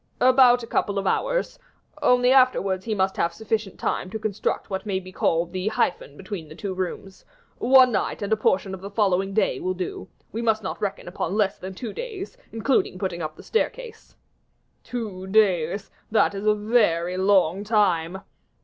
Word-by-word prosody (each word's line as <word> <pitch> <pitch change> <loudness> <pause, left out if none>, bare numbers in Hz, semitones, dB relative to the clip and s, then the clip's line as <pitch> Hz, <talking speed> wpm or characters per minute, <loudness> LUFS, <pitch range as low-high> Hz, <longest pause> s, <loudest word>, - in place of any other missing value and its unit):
"About 250 -1 +6
a - - -4
couple 205 -3 -1
of 195 - -1
hours; - - 0 0.4
only 250 0 +4
afterwards 200 -8 +3
he 220 -2 -1
must 190 -1 0
have 170 - +1
sufficient 220 -2 -3
time 185 - -2
to 220 - -4
construct 215 -2 -2
what 190 -2 -4
may 195 -3 -1
be 185 0 -11
called 170 -1 0
the 185 +2 -2
hyphen 175 -8 -1
between 190 -5 -7
the 155 - -11
two 195 +2 -4
rooms. 185 +1 -5 0.4
One 255 0 +6
night 210 - -1
and 205 +2 0
a - - +5
portion 195 -2 +1
of 190 - -7
the 200 - -7
following 195 -2 +1
day 190 -11 +1
will 185 0 -2
do; 180 0 -5 0.2
we 225 - -3
must 220 -2 +1
not 190 - -5
reckon 200 -3 -3
upon 175 +1 -3
less 205 -2 +1
than 190 0 -7
two 225 +2 -6
days, 445 -3 -6 0.2
including 225 -3 0
putting 185 -2 -3
up 155 -1 -4
the - - -13
staircase." 465 0 -3 0.7
"Two 205 -6 -5
days, 195 -2 +2 0.2
that 215 -1 +3
is 200 +2 -4
a 210 - +5
very 205 -6 +1
long 190 -1 +3
time." 190 -4 +1
200 Hz, 185 wpm, -24 LUFS, 185-225 Hz, 0.7 s, About